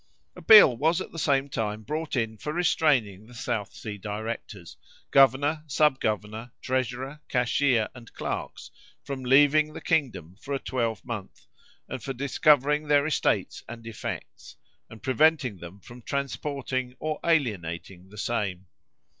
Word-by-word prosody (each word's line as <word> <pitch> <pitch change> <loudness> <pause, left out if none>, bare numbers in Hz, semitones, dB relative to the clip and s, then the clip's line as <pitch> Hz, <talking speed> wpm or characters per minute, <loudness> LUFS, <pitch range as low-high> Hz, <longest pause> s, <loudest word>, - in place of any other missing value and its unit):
A - - -11
bill 210 - +9
was 160 +7 +2
at - - -6
the 165 - -7
same 140 -2 +2
time 110 -4 -3
brought 155 +7 -3
in 115 -3 -1
for 150 +7 -5
restraining 135 - +1
the 125 - -14
South 115 -5 -3
Sea 105 -2 -7
directors, 110 +3 -6 0.4
governor, 140 +3 +4
sub 150 -1 +2
governor, 110 +2 -3
treasurer, 130 +3 -3
cashier, 125 -1 +2
and 120 -3 -13
clerks - - -5 0.3
from 140 -2 -5
leaving 145 +4 +4
the - - -7
kingdom 130 - -1
for 140 - -3
a - - -2
twelvemonth, 115 -5 -4 0.4
and - - -6
for 135 - -4
discovering 145 +2 +2
their 145 -1 +4
estates 155 - 0
and 115 -1 -9
effects, 115 -2 -7 0.3
and 110 - -13
preventing 135 -5 +2
them 85 +3 -11
from 120 +6 -13
transporting 135 -1 -3
or 155 +1 -3
alienating 95 - -1
the 105 - -14
same. 100 -5 -2
130 Hz, 140 wpm, -26 LUFS, 110-145 Hz, 0.4 s, bill